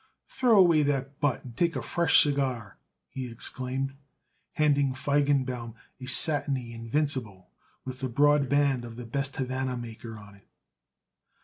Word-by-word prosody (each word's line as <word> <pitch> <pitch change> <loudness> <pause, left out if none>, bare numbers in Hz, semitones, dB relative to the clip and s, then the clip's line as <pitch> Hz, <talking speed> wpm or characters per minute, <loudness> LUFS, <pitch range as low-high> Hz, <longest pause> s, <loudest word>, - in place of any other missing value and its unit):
"Throw 245 -4 +2
away 170 -5 +5
that 140 -1 -2
butt 145 -4 -1
and 120 -3 -11
take 170 +5 0
a - - -3
fresh 170 -1 +3
cigar," 130 -7 -3 0.3
he 130 -2 -7
exclaimed, 130 +3 -3 0.6
handing 145 -4 +1
Feigenbaum 130 -4 -1 0.2
a 130 - -9
satiny 135 -4 +4
Invincible 115 -5 -3 0.3
with 130 0 -7
the 130 - -3
broad 145 +2 +2
band 140 -3 +1
of 115 -1 -9
the 125 0 -8
best 135 +4 -3
Havana 130 -2 -3
maker 115 -1 -9
on 105 -1 -14
it. 100 -1 -22
130 Hz, 140 wpm, -27 LUFS, 120-145 Hz, 0.6 s, away